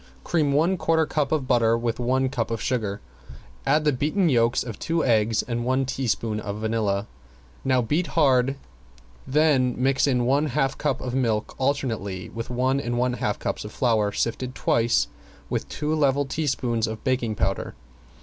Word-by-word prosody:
Cream 155 -4 +1
one 165 +7 +2
quarter 160 -1 +2
cup 150 -2 -1
of 150 -5 0
butter 115 -2 +3
with 115 0 -2
one 130 +2 +1
cup 125 -3 -2
of 115 -1 -2
sugar, 105 -5 -2 0.7
add 155 0 +3
the 150 - +3
beaten 155 +8 +1
yolks 120 -3 +2
of 115 -4 -7
two 165 0 0
eggs 110 -2 +2
and 120 -1 -3
one 130 +2 +1
teaspoon 115 -4 -1
of 100 -1 -5
vanilla. 110 -2 0 0.6
Now 130 -2 +2
beat 150 +10 0
hard, 135 -4 +3 0.7
then 135 -3 +3
mix 135 +2 +2
in 125 -3 +2
one 140 +4 +2
half 135 0 0
cup 150 -3 -1
of 125 - -4
milk 115 -5 0
alternately 115 -9 -2
with 115 0 -6
one 130 +2 +1
and 120 -3 -2
one 125 +1 +1
half - - -1
cups - - -3
of 105 - -8
flour 110 -5 +1
sifted 125 +4 -2
twice 115 - +2 0.4
with - - -2
two 150 +1 -2
level 145 -2 +2
teaspoons 125 -6 -1
of 110 -1 -6
baking 125 -4 0
powder. 95 0 -2
125 Hz, 170 wpm, -24 LUFS, 115-140 Hz, 0.7 s, butter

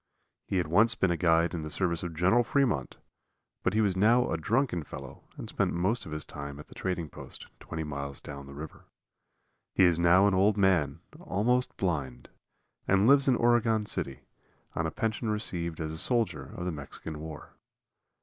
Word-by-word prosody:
He 95 - -1
had 90 - +1
once 110 +9 +4
been 95 -5 +1
a - - +2
guide 85 +1 +3
in 85 - -3
the 75 - -5
service 85 0 0
of 85 -2 -5
General 95 +9 +4
Fremont, 120 - 0 0.6
but 95 - 0
he 110 - +4
was 100 -4 +2
now 115 +6 +4
a - - +1
drunken 105 - 0
fellow 70 -2 -10
and - - -7
spent - - -1
most 95 +6 0
of - - -8
his 75 -1 -2
time 70 0 -7
at 75 - -9
the - - -14
trading 90 -4 -3
post, - - -10
twenty 80 0 -5
miles 70 -2 -5
down 70 -1 -9
the 70 - -10
river. 75 +2 -9 0.9
He - - +5
is 85 -2 +4
now 90 +3 +5
an 100 - +3
old 100 +3 +3
man, 95 -7 +2 0.2
almost 125 +6 0
blind, 70 -9 -2 0.6
and 100 +1 +4
lives 140 +2 +6
in 130 - +5
Oregon 115 -2 +2
City, 70 -9 -3 0.5
on 80 +1 -1
a - - -4
pension 110 +3 -2
received 85 -6 -3
as 80 -1 -3
a 80 - -3
soldier 120 0 +1
of 90 - -5
the 90 - -1
Mexican 75 +1 -7
war. 80 -1 -9
90 Hz, 190 wpm, -29 LUFS, 80-110 Hz, 0.9 s, lives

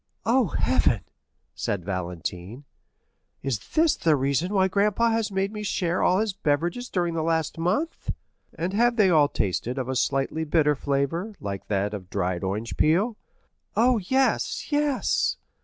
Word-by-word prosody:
"Oh, 240 0 +3
Heaven," - - +2 0.5
said 90 -4 -3
Valentine; 90 - -5 0.8
"is 130 -5 -1 0.2
this 320 0 +4
the 160 -2 +2
reason 140 +6 0
why 190 -2 +3
grandpapa 210 +4 +2
has 225 -2 0
made 195 +1 0
me 210 - -5
share 185 -4 -1
all 180 - +3
his 215 -1 0
beverages 175 +8 -1
during 175 -2 0
the 165 - -1
last 160 -1 -1
month?" 205 - -1 0.5
"And 175 +4 -2
have 235 +3 +3
they 205 -5 +4
all 150 -3 +5
tasted 115 +5 -2
of 130 -2 -2
a 130 - -2
slightly 135 +5 0
bitter 150 -1 +3
flavor, 145 +9 -2
like 100 -1 -5
that 100 0 0
of 95 -3 -7
dried 90 -2 -2
orange 105 +5 -3
peel?" 195 +9 +2 0.6
"Oh, 245 0 +4
yes, 260 - 0
yes!" 290 -2 +1
165 Hz, 155 wpm, -25 LUFS, 130-210 Hz, 0.8 s, all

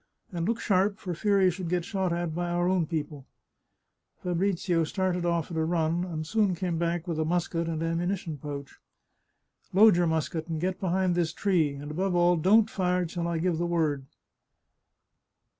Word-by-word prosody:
And 170 -1 -2
look 230 +1 0
sharp, 200 -1 +2
for 185 -4 -5
fear 200 +4 +2
you 185 - +5
should 175 -1 -5
get 175 -1 0
shot 190 -3 -1
at 170 -1 -2
by 175 +1 -2
our 175 0 +1
own 180 -3 +1
people! 150 -4 -4 0.4
" - - -44
Fabrizio 180 -1 0
started 180 +1 -1
off 170 0 -1
at 165 - -4
a 160 - +1
run, 165 +1 0
and 160 -3 -4
soon 205 0 +1
came 175 -2 -2
back 170 +1 -1
with 165 -2 -2
a - - +2
musket 170 0 -1
and 160 0 -2
ammunition 165 -1 -2
pouch. 140 0 -7 0.5
" - - -42
Load 215 0 +7
your 175 0 +2
musket, 160 0 -1
and 160 -2 -3
get 180 +2 -2
behind 185 0 +1
this 170 -2 0
tree; 165 -7 +1
and 145 +2 -7
above 185 +3 -1
all, 175 0 +4
don't 205 +7 +4
fire 180 -3 0
till 170 +1 -3
I 170 -1 -1
give 170 0 0
the 175 - 0
word." 155 -5 0
175 Hz, 190 wpm, -28 LUFS, 160-185 Hz, 0.5 s, Load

